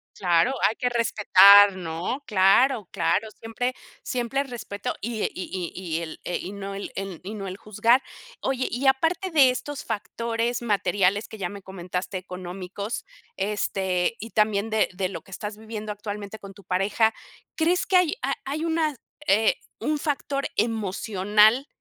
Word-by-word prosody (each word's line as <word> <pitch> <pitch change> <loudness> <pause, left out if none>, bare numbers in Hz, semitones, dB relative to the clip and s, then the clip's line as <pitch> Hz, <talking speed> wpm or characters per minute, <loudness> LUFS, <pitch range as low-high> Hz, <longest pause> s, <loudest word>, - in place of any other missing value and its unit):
Claro, 175 +6 +3 0.2
hay 220 - -4
que 250 -1 0
respetar, 205 -4 +7
¿no? 175 - -4
Claro, 210 +2 +4
claro, 220 +2 0
siempre 235 +4 -3 0.3
siempre 255 +3 -1
respeto, 220 -6 -5
y 225 0 -3
e - - +1
y 185 - -5 0.3
y 175 -3 -3
y - - -2
el 160 - -8
e 175 - -2
y 185 - -6
no 200 -1 -6
el 200 - -6
en 195 -4 -5
y 205 +3 -6
no 195 -2 -5
el 185 +1 -6
juzgar. 230 +4 +2 0.4
Oye, 260 -1 0
y 250 +4 -3
aparte 325 +7 +2
de 275 -5 +6
estos 280 +2 -4
factores 230 +2 -2
materiales 205 -2 +1
que 220 - -10
ya 175 -2 -2
me 200 -1 -9
comentaste, 185 0 -4
económicos, 185 +3 -6 0.3
este, 190 -1 0
y 225 - -7
también 210 0 +1
de 220 -1 +2
de 185 0 -2
lo 165 -4 -6
que 195 - -18
estás 210 +3 -6
viviendo 215 -1 -6
actualmente 210 0 -6
con 200 -1 -11
tu 200 0 -16
pareja, 200 +5 +2 0.4
¿crees 345 +1 +1
que 375 - +5
hay 360 -4 +3
ha 275 +2 0
hay 305 +4 -2
una, 320 -3 0 0.3
eh, 215 +3 +4 0.2
un 305 0 0
factor 280 -1 -2
emocional 215 +2 +2
210 Hz, 165 wpm, -25 LUFS, 195-245 Hz, 0.4 s, respetar